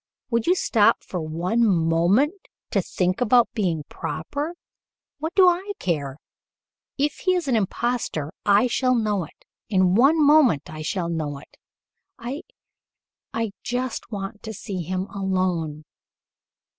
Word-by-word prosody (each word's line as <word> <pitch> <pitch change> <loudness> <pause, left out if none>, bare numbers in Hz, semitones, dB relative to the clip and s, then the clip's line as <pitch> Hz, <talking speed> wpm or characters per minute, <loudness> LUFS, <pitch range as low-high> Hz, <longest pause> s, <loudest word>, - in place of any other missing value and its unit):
Would 230 -1 0
you 360 - +5
stop 220 - +3
for 180 - -4
one 175 +9 0
moment 180 - +3 0.4
to - - +2
think 180 +2 -1
about 245 0 +4
being 175 -8 -1
proper? 290 - -4 0.6
What 320 +3 -4
do 375 -2 +7
I 370 +3 +1
care! 145 -6 -2 0.8
If 290 +1 0
he 370 -1 +1
is 350 -4 -2
an 255 - +2
impostor, 215 -7 -1
I 205 +3 +4
shall 255 +1 +2
know 210 -6 0
it. - - -21 0.2
In 185 -3 +3
one 275 +10 +5
moment 290 - +5
I 155 0 -7
shall 170 +2 -2
know 155 -4 -3
it. 140 - -15 0.6
I 255 +4 -5 0.9
I 225 -2 -2
just 250 0 -3
want 200 0 -5
to 220 - -6
see 190 -1 -5
him 185 +3 -2
alone. 185 -6 -1
205 Hz, 140 wpm, -24 LUFS, 170-255 Hz, 0.9 s, do